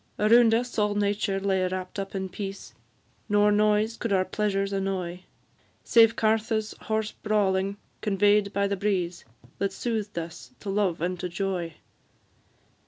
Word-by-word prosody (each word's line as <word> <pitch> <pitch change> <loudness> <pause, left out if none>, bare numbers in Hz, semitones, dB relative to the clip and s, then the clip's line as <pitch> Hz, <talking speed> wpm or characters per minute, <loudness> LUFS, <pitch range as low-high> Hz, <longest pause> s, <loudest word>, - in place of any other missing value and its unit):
Around 225 +1 +5
us 240 0 -1
all 210 0 +1
nature 205 -1 0
lay 190 -1 +1
wrapt 185 +1 -5
up 195 0 -5
in 190 0 -2
peace, 195 +1 -7 0.6
Nor 205 0 +4
noise 210 +2 +2
could 230 - -3
our 190 -1 +3
pleasures 200 0 -1
annoy, 185 -2 -3 0.6
Save 225 -1 +5
Cartha's 220 0 0
hoarse 220 -1 -1
brawling, 200 -2 0 0.2
convey'd 205 0 +3
by 200 0 +1
the 200 - -1
breeze, 185 -3 -1 0.3
That 195 0 0
soothed 215 -1 -3
us 170 +9 -6
to 200 - -4
love 195 -5 0
and 180 +1 -2
to 180 - -3
joy. 175 -3 -3
200 Hz, 145 wpm, -26 LUFS, 190-210 Hz, 0.6 s, Around